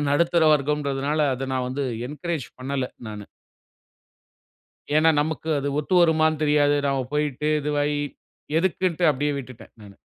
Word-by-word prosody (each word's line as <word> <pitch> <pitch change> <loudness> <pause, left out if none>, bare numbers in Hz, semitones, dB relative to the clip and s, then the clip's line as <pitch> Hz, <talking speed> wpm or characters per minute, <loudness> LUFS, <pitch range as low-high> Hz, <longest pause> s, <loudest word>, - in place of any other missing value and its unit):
நடுத்தர 170 +3 +2
வர்க்கம்ன்றதுனால 145 0 0
அத 130 +1 -4
நான் 130 -1 -1
வந்து 135 +2 -2 0.2
என்கரேஜ் 150 0 -4
பண்ணல. 135 0 -2 0.2
நானு. 105 -1 -7 1.7
ஏன்னா, 160 +1 +5
நமக்கு 160 +1 -3
அது 140 +1 -2
ஒத்து 165 +5 -1
வருமான்னு 160 -2 +3
தெரியாது. 145 -1 +3
நாம 135 -2 0
போயிட்டு 150 0 -1
இதுவாயி 145 0 0 0.6
எதுக்குன்ட்டு 180 -1 0
அப்படியே 145 +1 -1
விட்டுட்டேன். 130 -3 -11
ம். 100 - -14
145 Hz, 125 wpm, -24 LUFS, 135-155 Hz, 1.7 s, ஏன்னா